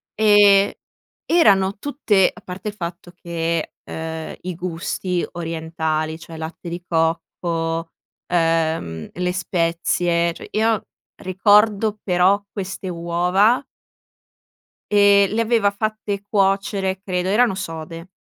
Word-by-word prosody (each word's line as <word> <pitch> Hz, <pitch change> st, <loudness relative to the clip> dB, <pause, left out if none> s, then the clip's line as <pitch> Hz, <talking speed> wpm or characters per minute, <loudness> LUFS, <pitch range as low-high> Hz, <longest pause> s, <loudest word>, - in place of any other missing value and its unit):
e 205 Hz, -2 st, +5 dB, 0.5 s
erano 200 Hz, -, +4 dB
tutte 225 Hz, -10 st, +2 dB
a 220 Hz, -, -14 dB
parte 185 Hz, +3 st, -8 dB
il -, -, -8 dB
fatto 175 Hz, -1 st, -7 dB
che, 165 Hz, -2 st, -3 dB
uhm, 160 Hz, 0 st, -6 dB
i 180 Hz, -1 st, -5 dB
gusti 180 Hz, +1 st, -3 dB
orientali, 160 Hz, -1 st, -3 dB
cioè 165 Hz, -1 st, -11 dB
latte 160 Hz, +2 st, -7 dB
di 175 Hz, +1 st, -6 dB
cocco, 165 Hz, 0 st, -1 dB, 0.4 s
ehm, 165 Hz, -, 0 dB
le 180 Hz, 0 st, -1 dB
spezie, 170 Hz, -1 st, 0 dB
cioè -, -, -11 dB
io 220 Hz, -1 st, +1 dB, 0.4 s
ricordo 210 Hz, +3 st, +3 dB
però 190 Hz, +2 st, +3 dB
queste 190 Hz, -1 st, -5 dB
uova 180 Hz, +8 st, +2 dB, 1.3 s
e 200 Hz, -1 st, +6 dB
le 225 Hz, +1 st, +1 dB
aveva 220 Hz, -3 st, +2 dB
fatte 210 Hz, -1 st, -3 dB
cuocere, 195 Hz, -1 st, +1 dB
credo 180 Hz, -1 st, -1 dB
erano 225 Hz, -1 st, +3 dB
sode, 165 Hz, -1 st, -7 dB
180 Hz, 110 wpm, -21 LUFS, 165-200 Hz, 1.3 s, e